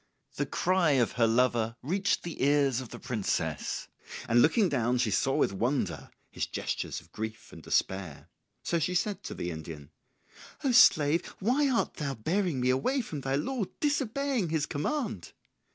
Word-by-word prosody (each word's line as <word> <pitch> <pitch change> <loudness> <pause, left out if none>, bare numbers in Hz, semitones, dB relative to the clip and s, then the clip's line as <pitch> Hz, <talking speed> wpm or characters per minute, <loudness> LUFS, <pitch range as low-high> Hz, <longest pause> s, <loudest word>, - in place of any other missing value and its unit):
The - - -1
cry 180 -4 +2
of 125 -4 +2
her 115 -2 +2
lover 115 -1 +2
reached 190 +8 0
the 170 - -6
ears 140 -3 +3
of 125 - -9
the - - -8
princess, 110 -6 -2 0.4
and 120 +1 +4
looking 200 - +4
down 125 -5 +1
she 120 -3 +1
saw 135 +7 +1
with - - +2
wonder 100 - -1 0.2
his - - -3
gestures - - -3
of 85 -1 -23
grief 110 +2 -6
and - - -10
despair. 95 -6 -1 0.4
So 170 - 0
she 180 +4 -1
said 200 +1 0
to - - -7
the 85 - -3
Indian, 80 -2 -8 0.7
"O 270 - +2
slave, 165 -9 +6 0.2
why 260 +8 +2
art 245 - 0
thou 140 -3 -3
bearing 165 - -1
me 125 +1 +3
away 255 - +1
from 155 - -6
thy 135 0 -1
lord, 200 - -2
disobeying 275 - 0
his 155 -2 0
command?" 155 - -3
145 Hz, 170 wpm, -29 LUFS, -, 0.7 s, slave